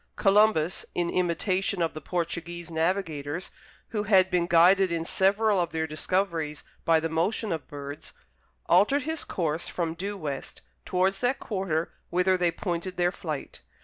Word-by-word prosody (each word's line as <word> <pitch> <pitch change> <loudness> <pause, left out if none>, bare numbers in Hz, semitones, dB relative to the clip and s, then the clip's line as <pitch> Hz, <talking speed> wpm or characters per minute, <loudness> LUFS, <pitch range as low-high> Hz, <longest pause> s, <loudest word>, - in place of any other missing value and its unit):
Columbus, 195 -5 +3
in 175 -1 0
imitation 185 +2 0
of 165 -1 0
the 155 - -7
Portuguese 170 -1 -4
navigators, 160 -2 -1 0.4
who 215 - -1
had 190 -3 +4
been 175 -1 +2
guided 180 +2 +5
in 165 -1 -1
several 200 +3 +3
of 170 -1 0
their 160 0 0
discoveries 160 -1 -1 0.2
by 165 -1 +4
the 160 - -1
motion 175 +7 0
of 160 -5 -3
birds, 145 0 -8 0.5
altered 275 +8 +4
his 320 +1 -2
course 165 -2 -2
from 165 -2 -2
due 200 +4 -4
west 150 -6 -6 0.2
towards 190 +1 +1
that 250 +2 +1
quarter 190 -6 -2 0.2
whither 180 +1 +3
they 180 -1 +2
pointed 175 +1 -4
their 175 0 +2
flight. 155 - -6
175 Hz, 150 wpm, -27 LUFS, 160-195 Hz, 0.5 s, guided